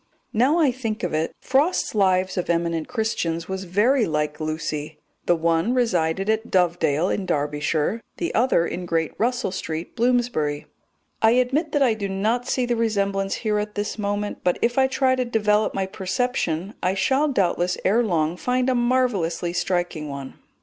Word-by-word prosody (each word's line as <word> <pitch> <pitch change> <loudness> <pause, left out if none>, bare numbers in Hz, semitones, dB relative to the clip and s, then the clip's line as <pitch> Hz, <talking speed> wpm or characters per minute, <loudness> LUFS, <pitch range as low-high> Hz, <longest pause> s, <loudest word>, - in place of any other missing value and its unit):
Now 260 +9 +3
I 305 -6 +4
think 225 -4 -4
of 180 - -2
it, 155 +1 0
Frost's 285 +7 +1
Lives 190 -2 +2
of 180 - -2
Eminent 170 -1 0
Christians 180 -9 -2
was 190 0 -4
very 220 +8 +2
like 150 -1 -1
Lucy. 155 -1 -4 0.3
The 175 - +4
one 165 +7 +1
resided 190 -6 +1
at 220 +1 0
Dovedale 175 -3 +2
in 195 -2 -2
Derbyshire, 150 +7 0 0.2
the 340 - -2
other 230 -8 +3
in 180 0 -5
Great 165 -2 0
Russell 240 -3 0
Street, 165 -3 -5
Bloomsbury. 235 -12 0 0.6
I 220 +1 +5
admit 265 +6 +1
that 290 -2 +3
I 245 -4 +3
do 205 -2 -4
not 220 +6 0
see 255 -1 0
the 240 0 0
resemblance 200 -3 0
here 215 -3 0
at 210 0 -4
this 210 +1 -3
moment, 205 0 -2
but 180 - +2
if 240 +1 +2
I 265 - +5
try 265 0 +2
to 255 - 0
develop 215 -3 +1
my 195 - 0
perception 190 -2 -2
I 185 +1 +1
shall 270 +9 +2
doubtless 180 -7 +1
ere 225 +5 +3
long 170 -5 0
find 250 +3 +1
a - - +2
marvellously 240 -9 0
striking 175 -4 -1
one. 140 -1 -7
200 Hz, 170 wpm, -23 LUFS, 170-240 Hz, 0.6 s, I